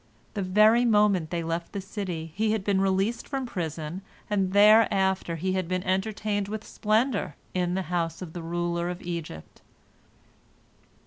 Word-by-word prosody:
The 210 - -2
very 215 +5 +5
moment 210 -7 +3
they 170 0 -2
left 165 +1 -3
the 200 - -3
city 185 -5 -5
he 215 +3 +1
had 220 -3 -1
been 195 -1 +1
released 195 +4 0
from 270 -2 -3
prison, 165 -4 -4 0.3
and 195 -2 +1
thereafter 200 -4 +4
he 185 +3 -1
had 185 -2 -1
been 185 0 -1
entertained 205 +1 -1
with 215 +1 -5
splendor 215 - 0 0.2
in 180 -1 0
the 190 - -1
house 165 -2 -1
of 175 -4 -8
the 175 - -5
ruler 170 +1 -2
of 180 0 -6
Egypt. 165 - -7
190 Hz, 155 wpm, -27 LUFS, 175-210 Hz, 0.3 s, very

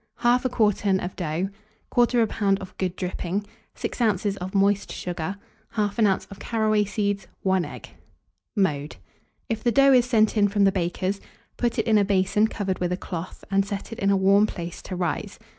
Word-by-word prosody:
1/2 245 +2 +3
quartern 210 -4 +2
of 180 0 -5
dough, 170 +1 -1 0.4
1/4 240 -1 +4
lb. 200 -2 +1
of 190 -1 -10
good 185 -1 -1
dripping, 185 +2 -3 0.3
6 - - -4
oz. 205 -3 +1
of 185 +2 -6
moist 200 +1 +2
sugar, 175 +1 -4 0.4
1/2 210 0 +2
oz. - - -11
of 195 - -10
caraway 215 -2 +1
seeds, 200 -1 -2 0.2
1 190 -2 +2
egg. 150 - -8 0.7
Mode. 150 -7 0 0.5
If 225 -3 -3
the 240 - +3
dough 275 +2 +6
is 250 -1 +5
sent 220 -3 +3
in 205 -1 +4
from 200 0 +1
the 195 - +5
baker's, 185 +1 -2 0.3
put 240 0 -1
it 225 - +1
in 220 -2 +4
a - - +4
basin 200 +2 +2
covered 195 -4 -3
with 180 -1 -1
a 180 - 0
cloth, 180 -1 -6
and 195 0 +3
set 200 +2 -5
it 225 - -7
in 195 - +2
a 200 - +4
warm 200 +2 +5
place 170 -3 -6
to 185 - -6
rise. 175 -1 -2
200 Hz, 190 wpm, -25 LUFS, 185-215 Hz, 0.7 s, dough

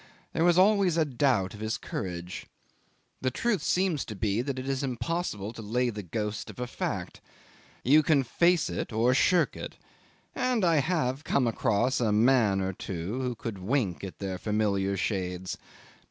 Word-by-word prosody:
There 165 - +1
was 175 0 +4
always 190 -3 +4
a 160 - +3
doubt 125 -8 +1
of 105 - -10
his 110 +1 -2
courage. 90 -2 -5 0.7
The 130 - +1
truth 210 - 0
seems 180 -2 +1
to 110 - -7
be 105 +2 0
that 135 +1 -3
it 130 +1 -5
is 135 0 -1
impossible 125 - -3
to 115 - -8
lay 120 +3 0
the 105 -1 -5
ghost 105 +3 -4
of - - -10
a 125 - -1
fact. 120 - -4 0.6
You 145 +5 +6
can 150 -3 +3
face 170 +6 +2
it 85 +5 -4
or 115 +3 +3
shirk 175 +6 +3
it - - -7 0.6
and 245 -6 +1
I 165 -2 +4
have 140 -3 0
come 140 -4 +1
across 115 +2 +1
a 110 -3 +2
man 110 -3 +4
or 95 0 -1
two 95 +7 -4
who 125 -2 -2
could 110 -3 -6
wink 100 -3 -1
at 95 - -7
their 95 -2 -4
familiar 100 -2 0
shades. 90 -2 -2
120 Hz, 175 wpm, -28 LUFS, 100-145 Hz, 0.7 s, You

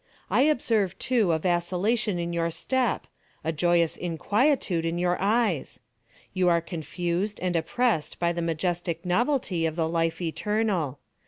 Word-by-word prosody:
I - - +4
observe, 220 - +1
too, 230 -8 +2
a 160 - +3
vacillation 180 +5 0
in 170 0 -3
your 170 0 0
step—a 195 -3 -3
joyous 170 +1 +2
inquietude 185 - +1
in 165 +1 -1
your 175 0 +1
eyes. 205 - 0 0.5
You 185 -1 +3
are 170 -1 +4
confused 175 +4 -3
and 180 -1 -1
oppressed 165 0 0
by 170 0 +1
the 170 - -3
majestic 170 +1 -2
novelty 185 - +1
of 160 - -4
the 165 -2 0
Life 165 0 0
Eternal. 180 - -1
175 Hz, 140 wpm, -26 LUFS, 165-210 Hz, 0.5 s, I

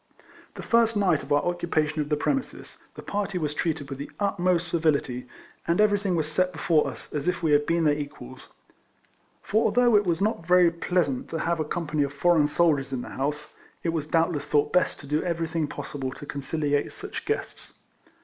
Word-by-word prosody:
The - - -7
first 230 -1 +3
night 180 -7 +2
of - - -11
our 145 - +3
occupation 160 -3 0
of 150 - -4
the 150 - +2
premises 270 - -3 0.2
the - - -9
party 200 -2 -2
was 150 -4 -2
treated 155 -3 -2
with 135 0 -7
the 140 - -6
utmost 180 -3 +1
civility, 145 -7 0 0.4
and 170 +3 +1
everything 205 -3 +3
was 155 -2 0
set 180 +4 +1
be - - -10
fore 160 -3 +2
us - - -9
as 150 +2 -3
if 180 -1 -1
we 160 - +2
had 145 0 +3
been 170 0 +2
their 150 -2 +4
equals; 145 - -7 1.0
for 220 +3 +1
although 240 +2 +4
it 205 - +5
was 170 -2 +1
not 205 -3 0
very 180 -1 +5
pleasant 170 -5 -1
to 165 - -3
have 170 +1 -1
a - - +1
company 155 -1 -2
of 140 -1 0
foreign 160 0 +3
soldiers 145 -4 +2
in 125 -2 -3
the - - -8
house, 150 +2 -3 0.3
it 170 - 0
was 160 -3 -2
doubtless 165 -3 +1
thought 145 0 +1
best 180 -1 +2
to - - -11
do 150 +2 0
everything 165 -2 -1
RIFLEMAN - - -10
HARRIS. - - -6
12 145 - -6
possible 130 -1 -2
to 145 - -10
conciliate 145 0 -1
such - - -6
guests. - - -4
160 Hz, 210 wpm, -26 LUFS, 145-180 Hz, 1.0 s, it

